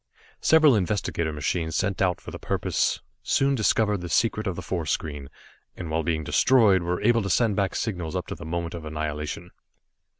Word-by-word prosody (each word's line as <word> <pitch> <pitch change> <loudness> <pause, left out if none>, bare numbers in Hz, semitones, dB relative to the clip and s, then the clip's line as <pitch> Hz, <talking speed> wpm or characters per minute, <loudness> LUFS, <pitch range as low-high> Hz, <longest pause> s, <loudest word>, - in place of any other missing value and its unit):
Several 155 -5 +6
investigator 90 -5 -1
machines 80 +3 -2
sent 95 0 -1
out 90 -3 +1
for - - -10
the - - -8
purpose - - -1 0.2
soon 140 0 +2
discovered 110 -3 +2
the 90 - -6
secret 110 +3 +1
of 95 - -2
the 90 - -6
force 85 -5 -3
screen, 70 -3 -3 0.5
and 85 -3 -6
while 80 +1 +1
being 80 -1 -1
destroyed, 105 - +4
were 85 +1 -2
able 115 +1 +4
to 100 - -3
send 115 -3 +2
back 100 -1 0
signals 90 -8 -3
up - - -2
to - - -6
the - - -9
moment 85 0 -3
of 85 -2 -7
annihilation. 75 +2 -4
90 Hz, 190 wpm, -25 LUFS, 80-105 Hz, 0.5 s, Several